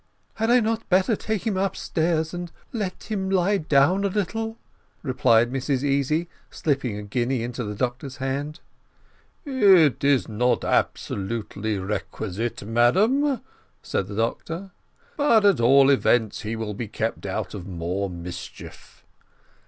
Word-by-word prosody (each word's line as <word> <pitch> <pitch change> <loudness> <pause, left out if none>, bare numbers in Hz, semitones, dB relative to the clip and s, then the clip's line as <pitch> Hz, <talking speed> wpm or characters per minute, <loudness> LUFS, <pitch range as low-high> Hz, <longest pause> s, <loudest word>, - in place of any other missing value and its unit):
"Had 225 +1 -1
I 245 0 +5
not 225 0 -2
better 190 +4 +3
take 220 0 -3
him 215 -4 0
upstairs, 165 -4 0
and 175 -1 -5 0.2
let 205 -6 -3
him 190 -3 -1
lie 195 +1 +2
down 155 +6 +3
a - - +3
little?" 220 +3 -2 0.5
replied 120 -4 +3
Mrs 135 0 -1
Easy, 145 +4 +1 0.2
slipping 135 -8 -1
a 105 - -6
guinea 120 +4 -1
into 120 +1 -4
the 105 -1 -5
doctor's 125 +4 -3
hand. 140 +4 -3 0.8
"It 195 - +5
is 140 -2 +3
not 120 +3 +1
absolutely 105 0 -1
requisite, 105 +3 -4
madam," 215 - +3 0.4
said 95 - -2
the 100 - -7
doctor; 165 - -3 0.5
"but 235 -8 +4
at 200 -9 +5
all 135 +3 +6
events 120 -5 +2
he 110 0 -3
will 110 -2 -4
be 110 +2 -5
kept 110 0 -3
out 95 +1 -3
of 95 -3 -7
more 90 +2 -3
mischief." 90 0 -9
135 Hz, 135 wpm, -24 LUFS, -, 0.8 s, all